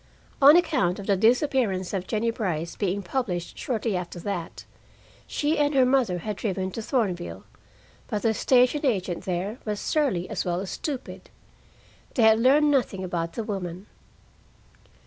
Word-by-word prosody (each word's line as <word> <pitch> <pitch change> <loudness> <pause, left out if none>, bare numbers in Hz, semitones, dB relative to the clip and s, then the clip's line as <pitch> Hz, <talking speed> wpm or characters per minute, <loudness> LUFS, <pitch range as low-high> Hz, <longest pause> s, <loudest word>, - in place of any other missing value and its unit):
On 285 +3 +9
account 195 - +1
of 200 - -7
the 200 - +2
disappearance 225 - +1
of 190 -2 -3
Jennie 230 +1 0
Brice 170 -7 -3
being 200 0 -1
published 180 -5 -3
shortly 225 -4 -2
after 175 -1 -5
that, 175 -3 -5 0.6
she 300 +2 0
and 290 0 +2
her 260 -1 +5
mother 250 -8 +2
had 205 +3 -5
driven 190 -3 -2
to 225 - -5
Thornville, 205 -8 -2 0.6
but 210 -3 -3
the 225 -1 +3
station 255 +5 +3
agent 190 - -1
there 190 +6 -3
was 210 -2 -3
surly 255 - 0
as - - -3
well 175 0 -1
as 190 0 -5
stupid. 280 -5 -6 0.9
They 240 - +3
had 220 0 +6
learned 290 +5 +4
nothing 240 -9 0
about 170 -2 -3
the 230 - -3
woman. 190 -3 -5
210 Hz, 155 wpm, -25 LUFS, 185-255 Hz, 0.9 s, On